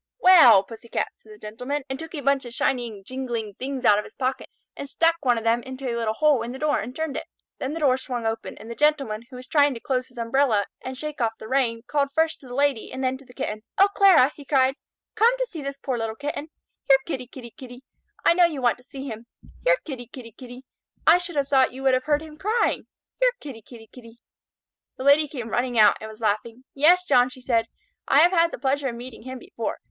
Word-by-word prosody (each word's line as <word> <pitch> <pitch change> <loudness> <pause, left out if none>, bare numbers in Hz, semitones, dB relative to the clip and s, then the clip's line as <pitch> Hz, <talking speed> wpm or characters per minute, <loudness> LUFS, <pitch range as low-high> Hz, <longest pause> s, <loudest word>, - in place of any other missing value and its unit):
"Well, 320 - +7
Pussy 225 +3 -12
cat!" - - -1
said 215 - -19
the 210 - -12
Gentleman, 250 +7 -5
and 265 0 -5
took 325 +1 -8
a 290 - -4
bunch 275 0 +1
of 240 0 -8
shining, 235 -8 -1
jingling 240 -3 -4
things 265 0 -4
out 205 0 +6
of - - -4
his - - -14
pocket 260 0 -3 0.3
and 280 - -7
stuck 330 +3 +2
one 245 -3 +3
of 225 - -4
them 230 +1 +2
into 260 +1 -7
a 240 - -1
little 225 -2 -1
hole 300 -4 +3
in 235 +1 -5
the 260 - -7
door 300 +1 +1
and 250 +3 -6
turned 315 -3 -3
it. - - -5 0.3
Then 265 +3 -3
the 330 - -5
door 265 -3 +3
swung 245 -3 -5
open, 225 0 -3
and - - -12
the 235 - -5
Gentleman, 275 -6 0
who 260 - -12
was 250 0 -9
trying 285 -1 +3
to - - -7
close 255 +1 -2
his 245 - -22
umbrella 230 -2 +1 0.2
and 260 0 -6
shake 300 -1 -5
off 225 -1 0
the 220 - -10
rain, 235 -3 0
called 280 0 0
first 320 0 +1
to 265 - -15
the 245 - -8
Lady 280 -4 0
and 265 - -5
then 255 0 0
to 275 - -17
the 250 - -16
kitten. 215 0 -4 0.2
"O 395 +1 +6
Clara!" 375 -9 +5
he 290 - -11
cried. 270 -2 +2 0.4
"Come 465 +3 +3
to - - 0
see 335 -10 -8
this 275 0 -5
poor 260 -3 -3
little 225 -1 -3
Kitten. 295 +3 -5 0.4
Here 270 - +8
Kitty, 255 -6 -4
Kitty, 245 -2 -11
Kitty! 255 -2 -12 0.4
I - - +6
know 350 0 +5
you 315 -5 -2
want 245 -1 +1
to - - -20
see 270 +1 -9
him. 225 -1 -8 0.4
Here - - +4
Kitty, 255 -6 -7
Kitty, 235 -2 -11
Kitty! 250 +2 -12 0.4
I 335 +3 +7
should 350 -2 -5
have 280 -2 0
thought 265 -3 +3
you 265 +1 -8
would 265 -1 +4
have 255 0 0
heard 300 0 +1
him 305 -1 -12
crying. 440 +4 0 0.3
Here - - +3
Kitty, 265 -7 -9
Kitty, 225 0 -14
Kitty!" 230 -2 -14 0.8
The - - -6
Lady 285 +2 +5
came 245 -6 -6
running 245 +1 -1
out 210 -2 +6
and 220 - -7
was 220 +1 -13
laughing. 225 +3 -2
"Yes, 340 +6 +5
John," 255 -7 +4
she 255 - -12
said, 230 -3 +1 0.4
"I 285 - +5
have 345 +2 +6
had 335 -2 +3
the - - -6
pleasure 275 0 0
of 240 - -4
meeting 245 +1 -9
him 260 +2 -7
before. 365 +9 -5
260 Hz, 250 wpm, -24 LUFS, 235-290 Hz, 0.8 s, Here